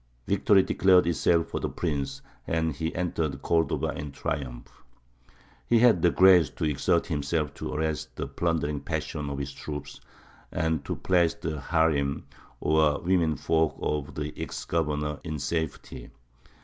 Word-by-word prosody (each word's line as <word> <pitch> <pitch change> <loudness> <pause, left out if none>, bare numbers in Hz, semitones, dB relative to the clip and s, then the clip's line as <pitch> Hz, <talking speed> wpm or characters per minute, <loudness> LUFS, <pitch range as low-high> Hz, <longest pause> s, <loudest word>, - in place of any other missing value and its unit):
Victory 100 0 +4
declared 95 -2 +4
itself 85 0 +2
for - - -3
the - - -2
prince, 70 -5 -3 0.2
and 80 -1 0
he 80 +2 -3
entered 80 -6 -2
Cordova 80 -1 +1
in 75 0 -5
triumph. 65 -3 -5 0.8
He 120 - +4
had 115 -7 +5
the 90 - +5
grace 90 -2 +6
to - - -7
exert 75 +3 +1
himself 75 -2 -1
to - - -6
arrest 80 0 -2
the - - -3
plundering 75 +1 -1
passions 75 +1 -4
of 70 - -4
his 70 -1 -4
troops, 75 +1 -7 0.5
and 80 -3 -1
to - - -2
place 85 -3 +2
the 80 -1 -4
harīm 70 -2 +1 0.4
or 75 -1 +3
women 85 -3 +2
folk 80 0 +1
of 75 -2 -2
the 75 0 -4
ex - - -5
governor 75 -2 -1
in 80 -3 -4
safety. 80 +2 -4
80 Hz, 150 wpm, -27 LUFS, 75-85 Hz, 0.8 s, grace